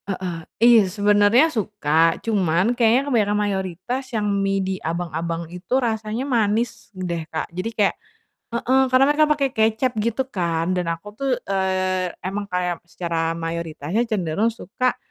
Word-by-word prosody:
Heeh, 185 -2 -3 0.3
iya 235 -2 +8
sebenarnya 205 - +4
suka, 165 -7 +1
cuman 195 -1 +2
kayaknya 240 +2 +3
kebanyakan 215 -7 +1
mayoritas 195 +4 -2
yang 210 - -1 0.2
mie 195 0 +1
di 190 0 -1
abang-abang 165 0 -3
itu 180 +6 -7
rasanya 225 0 -1
manis 230 -3 0
deh 175 -2 -3
Kak, 160 - -3
jadi 185 +6 -3
kayak 205 -2 +3 0.5
heeh, 245 +3 +1
karena 255 +1 +5
mereka 305 0 +3
pakai 280 -2 +2
kecap 220 +3 +2
gitu 235 +4 -1
kan, 170 -6 -1
dan 180 -2 -1
aku 165 +4 -5
tuh, 275 +5 -3 0.2
eee, 185 -1 0 0.2
emang 200 +2 -3
kayak 180 -2 -2
secara 165 -2 -2
mayoritasnya 165 +6 -3
cenderung 200 +1 0
suka 230 +3 -2
200 Hz, 145 wpm, -22 LUFS, 175-230 Hz, 0.5 s, iya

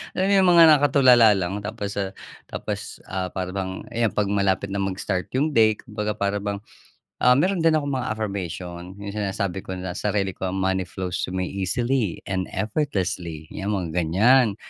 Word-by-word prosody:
Alam 190 +1 +1
mo 200 - +3
yung 190 -2 +5
mga - - +10
nakatulala 130 -6 +6
lang, 95 +1 -2
tapos 105 -1 -5
ah, 100 -1 -2 0.4
tapos - - -5
ah, 95 -1 -3
para 95 0 -4
bang, 95 -1 -3 0.2
ayan 115 -2 +2
‘pag 105 -1 0
malapit 100 -1 +1
na - - -1
mag-start 95 -1 -3
yung 145 +3 0
day, 110 -2 +4
kumbaga 105 -2 -4
para 100 -1 -1
bang 100 -1 -2 0.6
ah, 125 0 +5
meron 180 +6 +2
din 165 -1 +4
akong 145 -2 -1
mga 130 -2 -2
affirmation, 90 -3 -5
yung 100 - -5
sinasabi 100 -2 -2
ko 95 - -6
na 90 0 -5
sarili 100 +1 -1
ko, 95 0 -4
“Money 95 -1 0
flows 90 0 -4
to 90 - -5
me 95 -1 -2
easily 110 +2 -1
and 95 -1 -2
effortlessly.” 95 - -2
‘Yan 100 +1 -3
mga 90 -4 -3
ganyan. 100 +8 +3
100 Hz, 180 wpm, -24 LUFS, 95-115 Hz, 0.6 s, mga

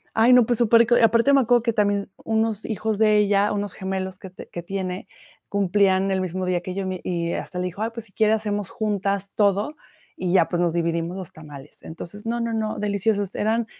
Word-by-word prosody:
ay, 225 +3 +5
no, 250 -2 +7
pues, 240 0 0
superrico. 235 +1 +5
Aparte 230 +4 +4
me 275 - +6
acuerdo 240 -1 +3
que 230 -1 0
también 205 -2 0
unos 220 -1 0
hijos 215 -1 -2
de 215 -1 +4
ella, 205 0 +3
unos 205 -2 -3
gemelos 190 0 -4
que 190 - -9
te 185 - -12
que 175 - -6
tiene, 185 0 -4 0.4
cumplían 195 -1 +2
el 190 -1 0
mismo 185 0 -3
día 180 -1 0
que 185 0 -6
yo. 195 -1 -2
Mi 185 -1 -3
y 170 -1 -2
hasta 180 - -5
le 180 - -1
dijo: 180 +3 -6
"Ay, 225 - -2
pues, 230 -1 -7
si - - -24
quiere, 215 +2 +3
hacemos 205 -3 -2
juntas 200 -2 -2
todo, 205 +7 +1 0.4
y 180 -1 -2
ya, 175 -4 +4
pues, 175 - -1
nos 170 -2 +1
dividimos 170 +1 -1
los 185 -3 -7
tamales". 150 -2 -12
Entonces, 170 +6 -9
no, 235 +1 -1
no, 230 0 -2
no, 220 -1 -2
deliciosos 205 -1 0
eran, 225 +2 0
200 Hz, 215 wpm, -23 LUFS, 185-220 Hz, 0.4 s, no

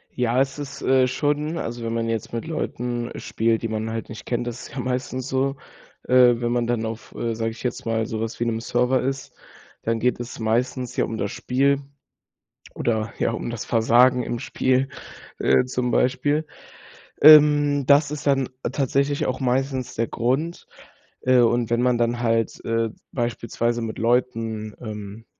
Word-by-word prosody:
Ja, 125 +1 +2
ist 135 +1 -1
es, 145 -1 -7
äh, 130 -1 +4
schon 150 +4 -1
also, 120 -4 -4
wenn 115 0 -2
man 115 0 -1
jetzt 115 -1 -3
mit 115 - -3
Leuten 125 -6 -3
spielt, 115 0 0
die 115 - -1
man 110 0 -3
halt 115 0 -5
nicht 110 -4 -9
kennt, 120 0 -2
das 120 +1 -6
ist - - -15
ja - - -3
meistens 130 +1 -3
so. 135 +1 0 0.5
Äh, 125 -2 +5
wenn 120 0 0
man 120 -1 +1
dann 120 -2 0
auf, 110 0 -7
äh, 115 -1 -2
sage 115 0 -2
ich 110 - -11
jetzt 125 -2 -3
mal, 115 -1 0
so 110 -3 -4
was 115 0 -4
wie 120 - 0
'nem 115 -1 -1
Server 125 +2 +1
ist, 135 +1 -3 0.5
dann 115 0 0
geht 125 0 +1
es 120 0 -7
meistens 120 +3 -1
ja - - +1
um 110 - -5
das 100 -2 -2
Spiel 135 +3 +1 0.9
oder 110 -1 -1
ja, - - +1
um 115 - -4
das 120 -2 -5
Versagen 120 +2 +4
im 120 0 -3
Spiel, 130 +1 0 0.5
äh, - - +3
zum 125 -1 -2
Beispiel. 145 +6 +1 0.8
Ähm, 145 -2 +7
das 145 0 +5
ist 150 -1 -5
dann 135 -2 +2 0.2
tatsächlich 140 +1 0
auch 130 - -2
meistens 130 0 -1
der 115 0 0
Grund. 135 +9 -1 0.5
Äh, 130 0 +4
und 120 -1 +3
wenn 120 +1 +1
man 125 -1 +2
dann 120 0 0
halt, 115 -2 0
äh, 115 0 0 0.2
beispielsweise 120 -1 -1
mit 110 -1 -4
Leuten, 115 -3 0
ähm, 105 -1 -7
120 Hz, 180 wpm, -23 LUFS, 115-130 Hz, 0.9 s, Ähm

